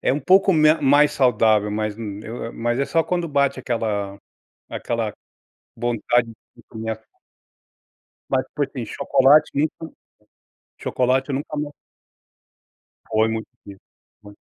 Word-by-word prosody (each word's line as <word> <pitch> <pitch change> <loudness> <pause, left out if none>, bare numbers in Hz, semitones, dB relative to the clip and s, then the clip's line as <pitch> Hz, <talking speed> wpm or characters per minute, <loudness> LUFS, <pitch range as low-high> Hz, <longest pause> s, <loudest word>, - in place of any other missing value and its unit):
é - - +1
um 145 - -1
pouco 190 +6 +4
me 155 -2 +5
mais 145 +1 +4
saudável, 110 -5 +3
mas, 105 0 -2
hum, 105 -3 -6
eu 115 +3 -6
eu 115 - -6
mas 120 +1 -2
é 140 - +1
só 165 - +2
quando 175 0 -2
bate 140 -2 +1
aquela 105 -5 -2 0.5
aquela 115 -3 -3 0.6
vontade 120 +1 +1 0.3
de - - -18
comer 110 -1 -5
a - - -2 1.3
Mas, 130 -1 +1
por 145 -2 0
sim, 125 -5 -6
chocolate, 140 +6 +3
nunca 155 +2 -2 0.8
chocolate 130 +2 0
eu 135 - -1
nunca 150 +1 -5
mais 145 0 -3 1.4
Foi 110 0 +2
muito 110 0 -4 0.2
difícil, 100 -1 -11 0.4
muito. 105 0 -14
125 Hz, 140 wpm, -22 LUFS, 110-145 Hz, 1.4 s, me